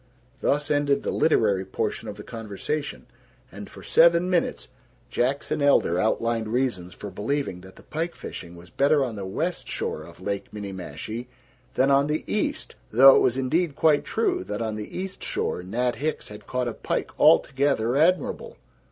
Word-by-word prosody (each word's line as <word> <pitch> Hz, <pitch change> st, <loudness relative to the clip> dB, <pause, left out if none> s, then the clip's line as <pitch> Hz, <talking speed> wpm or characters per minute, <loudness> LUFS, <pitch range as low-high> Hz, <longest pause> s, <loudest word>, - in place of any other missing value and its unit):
Thus 145 Hz, +3 st, 0 dB
ended 145 Hz, -1 st, +2 dB
the -, -, -1 dB
literary 105 Hz, -11 st, +2 dB
portion 95 Hz, -, -3 dB
of 100 Hz, -, -5 dB
the 105 Hz, -, -8 dB
conversation, 115 Hz, +8 st, -5 dB, 0.5 s
and -, -, -9 dB
for -, -, -12 dB
seven 170 Hz, +2 st, +4 dB
minutes 175 Hz, -2 st, 0 dB, 0.4 s
Jackson 140 Hz, +4 st, 0 dB
Elder 140 Hz, -11 st, +3 dB
outlined 115 Hz, +2 st, 0 dB
reasons 110 Hz, -7 st, -1 dB
for 105 Hz, -, -8 dB
believing 105 Hz, -1 st, -2 dB
that 95 Hz, +1 st, -14 dB
the -, -, -16 dB
pike 165 Hz, +2 st, -4 dB
fishing 85 Hz, -1 st, -8 dB
was 85 Hz, 0 st, -14 dB
better 140 Hz, -, +3 dB
on 120 Hz, -4 st, -3 dB
the 100 Hz, -2 st, -5 dB
west 165 Hz, -, -3 dB
shore -, -, -3 dB
of 85 Hz, +2 st, -13 dB
Lake 100 Hz, +1 st, -4 dB
Minniemashie 100 Hz, +3 st, -6 dB, 0.5 s
than 135 Hz, +2 st, +3 dB
on 140 Hz, +1 st, +4 dB
the 150 Hz, +1 st, -1 dB
east -, -, -2 dB, 0.2 s
though 135 Hz, +4 st, +8 dB
it -, -, +6 dB
was 125 Hz, -, +2 dB
indeed 150 Hz, +4 st, 0 dB
quite 155 Hz, -1 st, +3 dB
true 225 Hz, -, 0 dB
that 105 Hz, -, -4 dB
on 110 Hz, -2 st, -2 dB
the 105 Hz, -1 st, -7 dB
east 190 Hz, +1 st, -5 dB
shore -, -, -2 dB
Nat 120 Hz, +7 st, -1 dB
Hicks 155 Hz, +2 st, -3 dB
had 105 Hz, 0 st, -11 dB
caught 125 Hz, -1 st, -1 dB
a 120 Hz, -, -2 dB
pike -, -, -3 dB
altogether 135 Hz, -3 st, +3 dB
admirable. 170 Hz, +6 st, +1 dB
125 Hz, 170 wpm, -25 LUFS, 105-145 Hz, 0.5 s, though